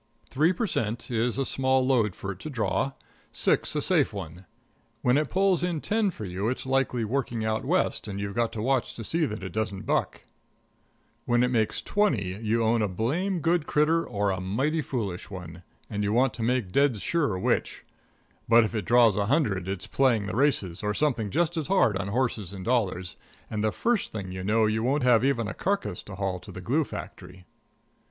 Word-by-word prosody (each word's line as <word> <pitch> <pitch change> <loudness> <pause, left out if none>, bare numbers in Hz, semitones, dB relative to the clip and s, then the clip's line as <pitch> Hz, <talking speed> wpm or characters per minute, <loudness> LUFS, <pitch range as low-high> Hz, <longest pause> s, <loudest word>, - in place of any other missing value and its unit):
Three 155 +6 +3
per 185 +5 -1
cent. 115 - -2
is 115 +1 0
a 135 - 0
small 130 -1 +2
load 115 -7 +2
for 100 - -5
it 95 - -9
to 155 - -6
draw; 135 +1 -1 0.4
six, - - +1
a - - 0
safe - - +2
one; 95 -2 -8 0.6
when 125 +1 +4
it 150 0 +1
pulls 190 -1 +2
in 175 -3 -1
ten 215 +5 +1
for 110 - -7
you 95 +4 -2
it's 130 - -3
likely 130 -3 +1
working 120 -2 -2
out 110 0 -1
West 175 -5 0
and 100 -1 -5
you've 100 0 -3
got 115 0 0
to 110 - -4
watch 130 0 0
to 115 - -6
see 160 +7 0
that 105 -3 -6
it 95 - -5
doesn't 105 -3 -3
buck; - - -1 1.0
when 120 0 +3
it 125 - +1
makes 110 -3 0
twenty 105 - 0
you 115 +1 +1
own 115 +1 +2
a 105 - +2
blame 160 - -1
good 165 0 +1
critter 160 +3 +2
or 100 -3 -1
a 95 0 -3
mighty 135 - 0
foolish 105 -11 -4
one, 90 -3 -8 0.3
and 105 -1 -3
you 100 - 0
want 125 +2 +3
to 115 - -7
make 120 -4 0
dead 140 -2 +2
sure 145 - 0
which; 90 - -1 0.6
but 115 0 +7
if 110 - -3
it 110 -2 -2
draws 115 -3 +5
a 100 0 0
hundred 105 - +1
it's 95 -1 -4
playing 120 -6 +2
the 105 - -4
races 115 - +1
or 105 0 -1
something 125 -8 0
just 170 - 0
as 155 - -2
hard 185 - +3
on 100 0 -2
horses 110 -4 -1
and 95 -2 -7
dollars, 95 -7 0 0.3
and 105 -1 -2
the 110 - +2
first 230 - 0
thing 100 -4 -5
you 95 0 -5
know 110 +3 +3
you 110 +1 0
won't 135 +4 +1
have 125 -2 +5
even 120 -5 +1
a - - -4
carcass 180 - -2
to 100 - -10
haul 95 -2 -2
to - - -12
the - - -8
glue - - +1
factory. 90 0 -9
115 Hz, 210 wpm, -27 LUFS, 100-135 Hz, 1.0 s, but